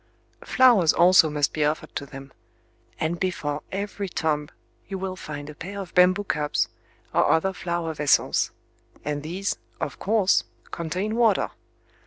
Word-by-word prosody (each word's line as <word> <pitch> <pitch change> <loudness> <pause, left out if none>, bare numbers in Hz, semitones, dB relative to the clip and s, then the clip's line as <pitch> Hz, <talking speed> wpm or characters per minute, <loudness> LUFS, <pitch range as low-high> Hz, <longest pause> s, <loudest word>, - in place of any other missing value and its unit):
Flowers 235 - +5
also 175 -2 +6
must 150 -1 0
be 155 - 0
offered 150 +1 -2
to 140 - -4
them; 135 0 -11 0.7
and 165 +2 -1
before 150 -6 -2
every 200 0 -4
tomb 150 -3 -1 0.4
you 195 - -4
will 190 0 -4
find 145 -5 -7
a 150 - -8
pair 190 +7 -7
of 190 -3 -7
bamboo 185 +2 +5
cups, 150 -6 0 0.4
or - - +3
other 190 +4 +2
flower 170 -2 -3
vessels; 150 -2 +2 0.6
and 145 0 -2
these, 180 +6 -3 0.2
of - - -4
course, 205 -2 +3 0.3
contain 185 +7 -3
water. 230 -4 +3
170 Hz, 145 wpm, -25 LUFS, 150-195 Hz, 0.7 s, also